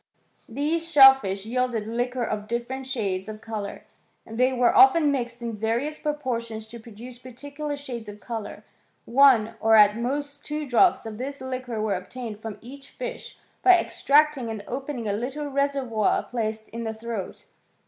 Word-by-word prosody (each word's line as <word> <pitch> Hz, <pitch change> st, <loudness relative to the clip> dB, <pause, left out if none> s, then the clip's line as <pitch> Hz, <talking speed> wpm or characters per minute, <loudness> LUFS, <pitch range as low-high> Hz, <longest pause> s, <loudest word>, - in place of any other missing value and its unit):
These 315 Hz, +7 st, -2 dB
shellfish 265 Hz, -, +6 dB
yielded 240 Hz, -2 st, -1 dB
liquor 245 Hz, +2 st, -2 dB
of 215 Hz, -2 st, -3 dB
different 240 Hz, +3 st, -4 dB
shades 200 Hz, -6 st, -2 dB
of 215 Hz, 0 st, -7 dB
colour; 215 Hz, -2 st, -6 dB, 0.4 s
they 250 Hz, +4 st, +1 dB
were 245 Hz, -2 st, +2 dB
often 335 Hz, -7 st, +6 dB
mixed 240 Hz, -3 st, -3 dB
in 230 Hz, -1 st, -3 dB
various 235 Hz, +8 st, -2 dB
proportions 235 Hz, -7 st, -3 dB
to 235 Hz, -, -9 dB
produce 235 Hz, +2 st, -11 dB
particular 285 Hz, +4 st, -6 dB
shades 240 Hz, -6 st, -7 dB
of 205 Hz, 0 st, -10 dB
colour. 225 Hz, -2 st, -6 dB, 0.4 s
One, 240 Hz, -4 st, +5 dB
or 225 Hz, 0 st, +4 dB
at 210 Hz, 0 st, +6 dB
most 285 Hz, +4 st, -3 dB
two 300 Hz, 0 st, -4 dB
drops 285 Hz, +6 st, +3 dB
of 220 Hz, -1 st, -7 dB
this 275 Hz, +2 st, -5 dB
liquor 255 Hz, -3 st, -5 dB
were 215 Hz, -1 st, 0 dB
obtained 210 Hz, +4 st, -6 dB
from 220 Hz, -2 st, -6 dB
each 275 Hz, +4 st, -13 dB
fish^ -, -, -6 dB, 0.3 s
by 370 Hz, -1 st, +7 dB
extracting 290 Hz, -6 st, +2 dB
and 220 Hz, -2 st, -5 dB
opening 265 Hz, -3 st, -4 dB
a 200 Hz, -, 0 dB
little 260 Hz, +8 st, -4 dB
reservoir 275 Hz, -6 st, 0 dB
placed 220 Hz, -2 st, -4 dB
in 230 Hz, +2 st, -6 dB
the 220 Hz, -1 st, -4 dB
throat. 220 Hz, -3 st, -6 dB
240 Hz, 160 wpm, -25 LUFS, 220-280 Hz, 0.4 s, by